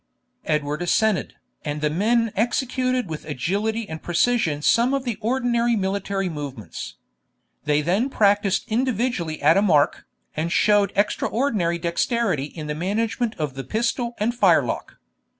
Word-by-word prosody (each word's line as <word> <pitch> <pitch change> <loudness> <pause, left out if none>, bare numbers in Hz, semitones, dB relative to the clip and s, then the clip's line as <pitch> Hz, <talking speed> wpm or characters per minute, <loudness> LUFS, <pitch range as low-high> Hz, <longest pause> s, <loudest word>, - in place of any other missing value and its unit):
Edward 150 +1 -1
assented, 205 +3 +1 0.3
and 150 -1 -3
the 150 0 +1
men 225 +6 +2
executed 255 +2 0
with 155 -2 -6
agility 205 - -2
and 160 -3 -7
precision 175 -4 +1
some 245 - +3
of 275 - -2
the 240 -4 -2
ordinary 240 0 +1
military 195 -1 -1
movements. 145 - -7 0.7
They 150 0 +2
then 195 - +1
practised 205 -4 +2
individually 230 -8 -1
at 160 +5 +5
a - - +4
mark, 155 -8 +2 0.3
and 160 +2 -2
showed 205 +1 +3
extraordinary 205 -3 0
dexterity 170 - 0
in 150 +1 -8
the 150 - -3
management 220 +7 -1
of 150 -5 -3
the 135 +1 -6
pistol 235 - -1
and 220 +3 0
firelock. 245 - +1
200 Hz, 135 wpm, -23 LUFS, 160-235 Hz, 0.7 s, at